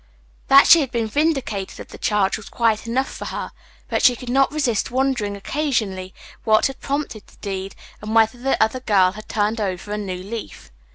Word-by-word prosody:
That 275 +1 +8
she 335 - +8
had 270 - -2
been 235 -2 -1
vindicated 250 -6 -1
of - - -9
the - - -11
charge 205 -3 +1
was 215 - -9
quite 230 -1 0
enough 260 +3 0
for - - -6
her, - - -5 0.4
but - - -1
she 250 -2 +5
could 245 +1 -7
not 270 +1 +3
resist 275 -8 0
wondering 245 -6 -1
occasionally 205 -7 -2 0.3
what 215 -1 +4
had 270 -1 -3
prompted 280 -6 -4
the - - -21
deed, 195 -1 -5 0.3
and 215 +1 -4
whether 225 +2 +3
the 270 +2 0
other 220 +4 +2
girl 195 -7 +3
had 215 +2 -11
turned 215 +1 0
over 190 0 -3
a 210 - -2
new 185 -3 -5
leaf. 220 +3 -8
220 Hz, 195 wpm, -21 LUFS, 205-265 Hz, 0.4 s, That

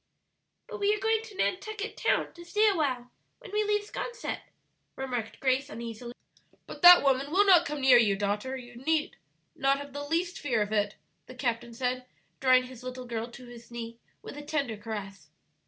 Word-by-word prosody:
"But 440 -3 -7
we 410 +1 +3
are - - -6
going 445 +1 +1
to 450 -3 -12
Nantucket 425 +3 -2
Town - - 0
to 345 - -12
stay 420 +5 +2
a 400 - +1
while 255 -6 -1 0.3
when - - -13
we 425 +1 +1
leave 415 0 +1
'Sconset," 475 +3 -5 0.6
remarked 250 -4 -4
Grace 270 +1 +1
uneasily. 235 -1 -7 0.5
"But - - -10
that 355 -2 +10
woman 275 0 +2
will 390 +6 +4
not 355 -4 +6
come 295 -1 -4
near 260 -2 +7
you, 210 -4 +3
daughter; 205 +6 -2
you 245 -1 -11
need, 305 +4 0 0.4
not 275 0 +2
have 285 -1 -9
the 285 - -4
least 340 +5 -1
fear 240 -8 +1
of 210 - -7
it," 205 -1 0 0.3
the 255 - -11
captain 235 -2 -2
said, 250 +1 -2 0.3
drawing 255 -1 +5
his 255 -1 -11
little 255 0 -7
girl 230 -1 -4
to 250 +1 -12
his 240 -1 -13
knee 235 -1 -7 0.2
with - - -8
a - - -6
tender 290 -6 -2
caress. 200 -6 -7
260 Hz, 190 wpm, -29 LUFS, 235-345 Hz, 0.6 s, that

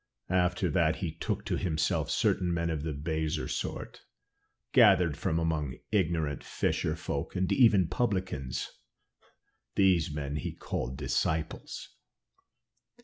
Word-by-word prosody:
After 90 0 +2
that 80 0 +3
he 85 -4 -3
took - - -3
to - - 0
himself 80 -3 0
certain 90 -1 +1
men 85 0 0
of 75 -2 -2
the 80 +1 -3
baser 80 +1 -2
sort, - - -4 0.7
gathered 85 -5 +6
from 80 - -1
among 80 -5 -1 0.2
ignorant 80 -8 0
fisher - - -1
folk, - - -4
and 90 0 0
even 105 -8 +5
publicans; 90 - -2 1.0
these 90 -6 +3
men 75 -1 -3
he 75 - -4
called 65 +3 -4
his 70 - -3
disciples. 80 -1 -2
80 Hz, 125 wpm, -30 LUFS, 75-90 Hz, 1.0 s, gathered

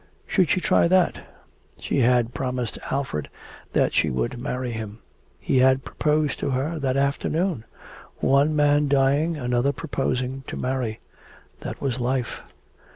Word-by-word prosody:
Should 185 -5 +2
she - - +3
try 175 - +3
that? 185 0 +2 0.6
She - - -1
had 120 -1 +3
promised 125 0 -3
Alfred 135 - -2 0.4
that - - +2
she - - +2
would 65 - -2
marry 125 -2 -3
him. 110 -2 -6 0.4
He 130 - +1
had 130 +1 +4
proposed 150 -1 0
to - - -1
her 140 +5 -1
that 135 -2 0
afternoon. 140 - 0 0.5
One 140 +3 +3
man 145 0 +3
dying, 140 +4 +2
another 125 0 +1
proposing 130 -1 -2
to - - -5
marry. 125 -4 -2 0.6
That - - -7
was 130 -2 -1
life. 125 0 -1
135 Hz, 140 wpm, -24 LUFS, 125-145 Hz, 0.6 s, had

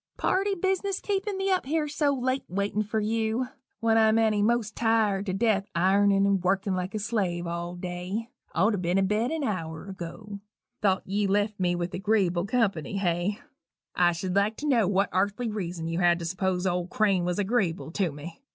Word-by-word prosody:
Party 390 +1 +1
business 385 +1 0
keepin' 400 0 -2
me 385 0 0
up 365 -8 +1
here 310 +1 0
so 290 0 +1
late 260 0 -1
waitin' 200 +3 -1
for 215 +1 -1
you 225 +3 0 0.3
when 225 0 +4
I'm 220 0 +4
eny 215 -2 +3
most 225 0 +1
tired 215 -3 +1
to 185 - -1
death 205 -1 +1
ironin' 195 +2 +4
and 195 -2 +1
workin' 195 +1 +1
like 185 +2 -3
a - - +1
slave 200 -5 -1
all 170 +1 -4
day 180 +6 -5 0.2
ought 210 +6 +3
to 205 - -1
ben 180 +1 0
abed 210 +5 +1
an 320 -1 -2
hour 165 - -3
ago. 195 +3 -7 0.4
Thought 190 -2 +2
ye 200 +1 0
left 205 +1 0
me 175 -1 +1
with 175 0 -3
agreeable 190 -3 +1
company, 200 - 0
hey? 180 +3 -1 0.5
I 175 -1 +4
should 180 +2 -3
like 205 +2 +2
to 300 - -4
know 235 -8 +3
what 195 0 +2
arthly 205 +5 0
reason 175 -5 -4
you 165 +1 -2
had 175 -1 +4
to 170 - -6
s'pose 185 +1 -1
old 180 -1 -1
Crane 195 -4 +2
was 180 0 -1
agreeable 195 -6 0
to 185 -2 0
me? 150 - -10
200 Hz, 190 wpm, -27 LUFS, 180-225 Hz, 0.5 s, when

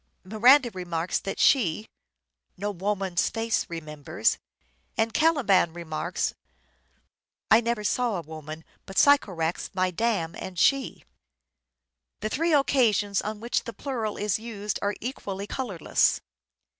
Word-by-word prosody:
Miranda 240 +6 +5
remarks 175 -2 -2
that 195 - -5
she 215 - +3 0.3
" 65 -1 -52
no 205 +2 -2
woman's 195 -1 -1
face 225 0 -1
remembers," 155 -4 -2 0.6
and 225 0 +1
Caliban 265 - +3
remarks 165 -3 -3 0.6
" - - -42
I 220 - +7
never 235 -2 -1
saw 235 +1 0
a 175 - -2
woman 155 0 -9 0.2
but 195 - -9
Sycorax 185 - +3
my 185 -1 +1
dam 180 -4 -1
and 190 -1 -7
she." 275 +8 +2 1.2
The 215 - -2
three 330 +8 0
occasions 230 -9 +3
on 215 0 -5
which 235 +1 -1
the 230 - -6
plural 230 -7 -4
is 210 0 0
used 210 -3 -4
are 205 +1 -1
equally 200 -5 -5
colourless. 205 - 0
205 Hz, 130 wpm, -26 LUFS, 175-235 Hz, 1.2 s, I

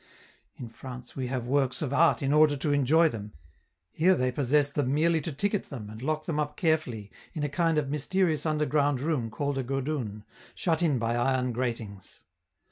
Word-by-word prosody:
In 125 - -8
France 125 +1 -10
we 130 -2 -3
have 125 -2 -3
works 130 +1 0
of 140 -2 -3
art 160 0 +3
in 135 +1 +1
order 150 -1 +5
to 145 +1 0
enjoy 145 +4 +4
them; 105 -7 -6 0.6
here 185 +4 +3
they 130 -4 0
possess 140 +2 +3
them 140 -2 -1
merely 160 +2 +2
to 160 - -4
ticket 205 +8 -1
them 110 -7 -8
and 110 +1 -10
lock 155 +3 -2
them 155 -3 -2
up 150 0 -2
carefully 130 - -1 0.2
in 155 - -2
a 145 - 0
kind 165 +2 +1
of 150 -2 +1
mysterious 155 +1 0
underground 150 -3 +1
room 140 -5 -1
called 140 +3 -2
a - - -1
'godoun', 130 -5 -3 0.3
shut 165 -2 0
in 155 -6 +2
by 115 0 -1
iron 125 +1 +1
gratings. 115 -5 -5
140 Hz, 190 wpm, -28 LUFS, 125-155 Hz, 0.6 s, order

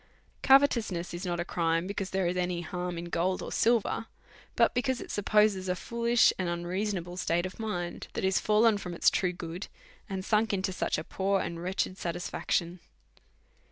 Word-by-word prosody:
Covetousness 235 -11 +3
is 175 +2 -4
not 175 -1 -1
a 175 - -1
crime, 165 -1 0
because 195 0 -3
there 190 -1 0
is 175 +1 0
any 180 -1 -1
harm 180 +1 -4
in 170 - -5
gold 180 +2 -1
or - - -6
silver, 230 -1 +1 0.5
but - - +4
because 250 0 0
it - - -7
supposes 205 -2 +2
a 180 - +1
fool 235 +5 -5
ish 235 0 +5
and 180 -2 0
unreasonable 175 +1 -3
state 175 -1 0
of 185 - -7
mind, 175 -6 -4
that - - -2
is 190 0 +3
fallen 215 0 +3
from 180 -3 -6
its - - +4
true 180 -2 +1
good, 175 +1 -6 0.4
and 190 -1 -4
sunk 215 0 +2
into 190 -1 -1
such - - -1
a 155 - -3
poor 195 +3 0
and 170 -2 -4
wretched 185 +1 -2
satisfaction. 175 0 -2
185 Hz, 185 wpm, -29 LUFS, 175-210 Hz, 0.5 s, ish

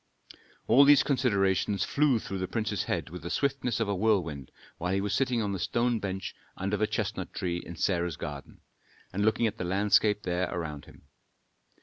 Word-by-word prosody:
All 140 - +7
these 145 0 +7
considerations 100 -7 +1
flew 140 -4 +2
through 95 -3 -5
the 95 - -2
prince's 105 -3 -2
head - - -2
with 90 - -7
the 85 - -6
swiftness 140 -2 0
of 115 - 0
a 100 - 0
whirlwind 90 - 0 0.3
while 90 +1 -1
he - - +1
was 100 +1 -2
sitting 125 -1 +1
on 100 - -1
the 95 - -3
stone 120 +4 0
bench 95 -1 -4 0.2
under 95 +2 -1
the 105 +1 +1
chestnut - - -3
tree 85 -2 -2
in 85 0 -9
Sarah's 85 -2 0
garden, 70 -1 -8 0.5
and 100 +2 0
looking 110 +2 +2
at 110 0 -2
the - - -2
landscape 105 +3 +2
there 90 0 -1
around 75 -4 -5
him. - - -17
100 Hz, 190 wpm, -29 LUFS, 90-115 Hz, 0.5 s, All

